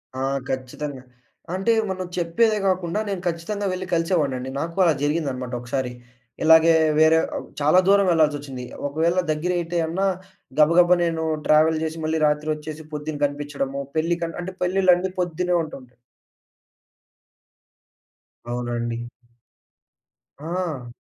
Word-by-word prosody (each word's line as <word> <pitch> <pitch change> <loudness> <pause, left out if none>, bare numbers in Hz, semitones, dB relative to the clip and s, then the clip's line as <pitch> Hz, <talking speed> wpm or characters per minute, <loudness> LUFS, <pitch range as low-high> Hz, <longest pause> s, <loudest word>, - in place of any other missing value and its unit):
ఆ! 130 - -4 0.3
ఖచ్చితంగా. 130 +1 -4 0.5
అంటే 195 +5 +2 0.2
మనం 185 -1 -3
చెప్పేదే 210 +6 +2
గాకుండా 185 0 0
నేను 195 -3 -3
ఖచ్చితంగా 175 +5 -3
వెళ్లి 185 0 -4
కలిసేవాడినండి. 150 -7 0
నాకు 165 +3 -4
అలా 170 -3 +4
జరిగిందనమాట 140 -5 -1
ఒకసారి. 125 +1 -3 0.5
ఇలాగే 160 +1 +7 0.3
వేరే 160 +1 +6 0.2
ఆహ్, - - -5
చాలా 150 +5 +5
దూరం 200 0 +5
వెళ్లాల్సొచ్చింది. 145 -5 0 0.2
ఒకవేళ 165 +5 +1
దగ్గరైతే 175 +2 -1
అన్నా 185 +4 -1 0.5
గబగబా 175 +3 +6
నేను 165 -1 -1 0.2
ట్రావెల్ 155 +1 +4
జేసి, 160 0 -3
మళ్ళీ 160 +1 0
రాత్రొచ్చేసి 150 +1 -2
పొద్దున్న 150 0 -4
కనిపించడము 145 -1 -3 0.2
పెళ్లిక 170 +1 0
అంటే 185 +1 -6
పెళ్లిళ్లన్నీ 185 0 +3
పొద్దున్నే 180 0 0
ఉంటుంటాయి. 130 -5 -10 2.6
అవునండి. 120 -1 -2 1.4
ఆ! 160 -5 -4
160 Hz, 110 wpm, -23 LUFS, 145-175 Hz, 2.6 s, ఇలాగే